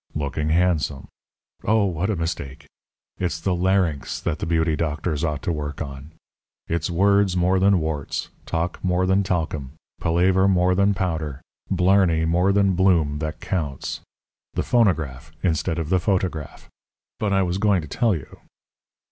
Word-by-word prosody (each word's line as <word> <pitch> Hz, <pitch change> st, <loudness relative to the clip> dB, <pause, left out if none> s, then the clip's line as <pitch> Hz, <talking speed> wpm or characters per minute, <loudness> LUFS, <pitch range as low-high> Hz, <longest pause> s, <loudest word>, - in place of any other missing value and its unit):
Looking 75 Hz, +1 st, -2 dB
handsome. 80 Hz, -5 st, +1 dB, 0.5 s
Oh, 110 Hz, 0 st, +3 dB
what 90 Hz, +1 st, -1 dB
a 110 Hz, -, +1 dB
mistake! 80 Hz, -4 st, -4 dB, 0.5 s
It's 85 Hz, -2 st, -1 dB
the 95 Hz, +2 st, 0 dB
larynx 90 Hz, -4 st, 0 dB
that 80 Hz, -3 st, -2 dB
the -, -, -3 dB
beauty 80 Hz, -1 st, +1 dB
doctors 75 Hz, 0 st, -2 dB
ought 75 Hz, -3 st, -2 dB
to -, -, 0 dB
work 75 Hz, -2 st, -4 dB
on. 70 Hz, -1 st, -7 dB, 0.6 s
It's 85 Hz, 0 st, -1 dB
words 100 Hz, +1 st, +3 dB
more 90 Hz, +2 st, +3 dB
than 95 Hz, 0 st, +4 dB
warts, 80 Hz, -3 st, -3 dB, 0.2 s
talk 85 Hz, +2 st, -2 dB
more 90 Hz, 0 st, +1 dB
than 95 Hz, +1 st, +3 dB
talcum, 80 Hz, -7 st, -2 dB, 0.3 s
palaver 90 Hz, +3 st, +3 dB
more 90 Hz, -1 st, +3 dB
than 100 Hz, +2 st, +3 dB
powder, 80 Hz, -7 st, -3 dB, 0.3 s
blarney 90 Hz, -3 st, +3 dB
more 90 Hz, +4 st, +2 dB
than 100 Hz, -1 st, +3 dB
bloom 85 Hz, -6 st, +2 dB
that 80 Hz, +2 st, -4 dB
counts 75 Hz, -8 st, -3 dB, 0.6 s
the -, -, 0 dB
phonograph 80 Hz, -, +1 dB
instead 85 Hz, -1 st, 0 dB
of 80 Hz, -2 st, -3 dB
the 95 Hz, 0 st, +3 dB
photograph. 90 Hz, -5 st, -2 dB, 0.5 s
But 105 Hz, -2 st, 0 dB
I 95 Hz, -1 st, +3 dB
was 90 Hz, +1 st, -1 dB
going 100 Hz, -5 st, +2 dB
to -, -, -8 dB
tell 110 Hz, -, +1 dB
you. 75 Hz, -, -9 dB
85 Hz, 155 wpm, -23 LUFS, 80-95 Hz, 0.6 s, than